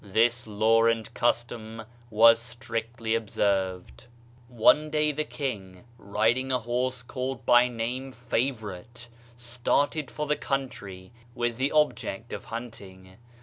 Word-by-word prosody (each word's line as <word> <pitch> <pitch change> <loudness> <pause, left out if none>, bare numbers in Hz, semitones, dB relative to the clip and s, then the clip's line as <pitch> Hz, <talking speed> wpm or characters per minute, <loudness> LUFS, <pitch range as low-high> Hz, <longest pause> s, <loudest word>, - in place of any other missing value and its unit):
This 115 +3 +1
law 110 +2 +3
and 115 0 0
custom 115 -2 -1 0.3
was 115 +1 +6
strictly 115 -1 -4
observed. 95 - -1 0.4
One 125 +6 +4
day 150 0 +2
the 150 +1 -2
King, 100 -12 -5 0.2
riding 115 +6 +1
a 130 - +3
horse 125 +1 -2
called 130 -1 -5
by 120 0 +6
name 125 +3 -4
"Favorite," 120 -2 -4 0.3
started 125 +5 0
for 150 - -4
the 150 0 +1
country, 110 -11 -4 0.2
with 120 -1 -1
the 135 +2 0
object 135 -7 0
of - - -6
hunting. 95 -5 -9
115 Hz, 120 wpm, -27 LUFS, 110-125 Hz, 0.4 s, was